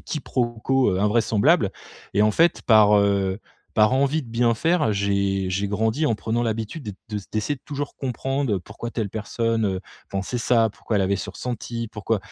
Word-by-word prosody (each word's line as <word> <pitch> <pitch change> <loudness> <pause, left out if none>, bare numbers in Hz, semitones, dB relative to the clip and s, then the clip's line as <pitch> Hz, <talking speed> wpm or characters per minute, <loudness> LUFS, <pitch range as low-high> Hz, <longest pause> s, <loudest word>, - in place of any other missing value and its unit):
quiproquos, 130 -3 0
heu, 95 - 0
invraisemblables. 105 0 +3 0.4
Et 105 - +4
en 105 - +4
fait 165 +6 +3
par, 105 -2 +6
heu, 100 -1 +1 0.4
par 110 +2 +4
envie 140 +4 +2
de 125 - -12
bien 115 +1 +2
faire 160 0 +2
j'ai 100 -1 0
j'ai 100 +2 -1
grandi 110 +8 0
en 115 - +2
prenant 115 +2 -1
l'habitude 115 +6 -3
d'être 105 -3 -7
de 105 -2 -3
d'essayer 110 +7 -1
de - - -25
toujours 145 0 -5
comprendre 135 -3 -1
pourquoi 105 +5 -8
telle 110 -3 -2
personne, 115 +1 -1
heu, 95 -2 -1 0.3
pensait 100 +5 -3
ça. 115 -1 +3
Pourquoi 110 +1 -3
elle 100 - +3
avait 100 +1 +1
ce - - -5
ressenti. 120 -1 -5
Pourquoi, 105 0 -1
110 Hz, 180 wpm, -23 LUFS, 100-125 Hz, 0.4 s, par